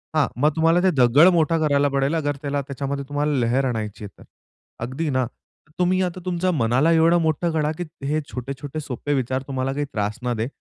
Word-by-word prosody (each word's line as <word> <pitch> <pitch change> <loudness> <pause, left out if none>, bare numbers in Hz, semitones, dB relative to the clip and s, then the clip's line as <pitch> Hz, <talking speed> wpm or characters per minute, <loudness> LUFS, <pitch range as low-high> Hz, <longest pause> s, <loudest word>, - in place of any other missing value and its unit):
हां, 150 -4 +3
मग 150 - +5
तुम्हाला 165 +2 +3
ते 190 - +5
दगड 130 +7 +6
मोठा 165 -1 +2
करायला 145 -2 +2
पडेल 140 +2 +1 0.3
त्याला 140 -1 -1
त्याच्यामध्ये 140 +1 -4
तुम्हाला 145 0 0
लहर 125 +3 +1
आणायची 110 -4 -3
आहे - - -8
तर, - - -13 0.6
अगदी 140 +6 -3
ना. 130 -2 +1 0.5
तुम्ही 185 +1 +2
आता 180 0 -3
तुमच्या 180 0 0
मनाला 130 +2 +2
एवढं 165 +1 +4
मोठं 160 +2 0
करा, 155 -1 +1
की 175 - -3 0.2
हे 150 +2 +1
छोटे-छोटे 140 +4 -5
सोपे 145 0 -3
विचार 130 -1 -1
तुम्हाला 135 -1 -2
काही 145 +1 -2
त्रास 105 +2 -2
न 125 -1 0
दे. 110 - -1
145 Hz, 190 wpm, -23 LUFS, 130-160 Hz, 0.6 s, दगड